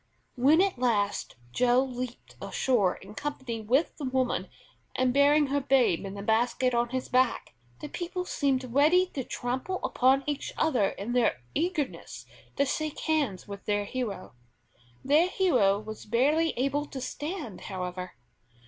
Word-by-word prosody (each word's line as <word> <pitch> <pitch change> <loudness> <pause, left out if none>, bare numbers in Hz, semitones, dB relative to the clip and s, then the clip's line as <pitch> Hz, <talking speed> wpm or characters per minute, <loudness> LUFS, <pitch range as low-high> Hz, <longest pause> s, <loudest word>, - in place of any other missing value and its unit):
When 285 +7 +5
at 390 -9 0
last 210 -5 0 0.2
Joe 245 - +3
leaped 250 -2 -7
ashore 215 -9 +1
in 195 +2 -12
company 260 -3 -4
with 255 +9 +1
the 300 - -7
woman, 255 -1 -1 0.5
and 255 -1 +2
bearing 290 +2 +5
her 285 - +2
babe 255 -10 +2
in 195 - -7
the 200 - -6
basket 240 +3 +1
on 235 0 +1
his 260 +1 -3
back, 255 -1 +1 0.3
the - - -5
people 360 +3 -4
seemed 260 -7 -1
ready 315 +7 +5
to 265 - -3
trample 260 +11 -3
upon 265 +2 +3
each 290 -1 -3
other 250 -11 +2
in 215 +5 -5
their 235 - +1
eagerness 320 -3 -3 0.3
to 280 - +2
shake 310 +2 -3
hands 285 - -1
with 200 -1 -8
their 205 -1 0
hero. 220 -5 -4 0.7
Their 300 +6 +4
hero 255 - +3
was 215 0 -9
barely 290 +8 +2
able 275 +3 0
to 270 - -7
stand, 290 - -5
however. 180 -1 -5
255 Hz, 150 wpm, -28 LUFS, 225-290 Hz, 0.7 s, When